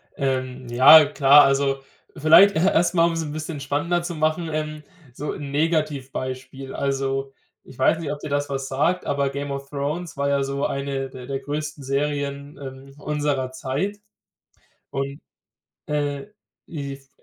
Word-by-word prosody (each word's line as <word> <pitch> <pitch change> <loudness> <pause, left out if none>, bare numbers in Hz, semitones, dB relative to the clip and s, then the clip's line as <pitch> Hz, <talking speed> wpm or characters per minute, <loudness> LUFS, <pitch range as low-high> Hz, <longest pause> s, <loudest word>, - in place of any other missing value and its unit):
Ähm, 130 -2 -2
ja 135 +6 +9
klar, 145 0 +6
also, 135 0 +1 0.3
vielleicht 165 +7 +7
e - - +2
erst 175 -1 +3
mal, 170 -2 +4
um 170 - -1
es 165 0 -2
ein 150 - -5
bisschen 155 0 -5
spannender 145 +5 -1
zu 175 0 -4
machen, 155 +2 0
ähm, 155 0 -4 0.3
so 145 +4 -4
'n 145 -2 -6
Negativbeispiel. 135 -4 -2
Also, 135 0 -1 0.3
ich 130 - -15
weiß 130 +5 +4
nicht, 155 -3 -3
ob 145 - -5
dir 150 - -7
das 145 0 -1
was 135 -1 -3
sagt, 150 +7 0
aber 140 -1 +1
„Game 140 +1 -5
of 140 0 -6
Thrones“ 150 +4 -3
war 140 0 0
ja 140 -1 +2
so 140 +1 -2
eine 135 -1 -3
der 130 -1 -10
der 135 +1 -3
größten 150 +1 -5
Serien, 140 +1 -2
ähm, 135 0 -9
unserer 145 -3 -1
Zeit 140 +10 -3 0.9
und 140 +1 -3 0.7
äh, 145 0 -2 0.4
if 140 -3 -7
140 Hz, 160 wpm, -23 LUFS, 135-155 Hz, 0.9 s, ja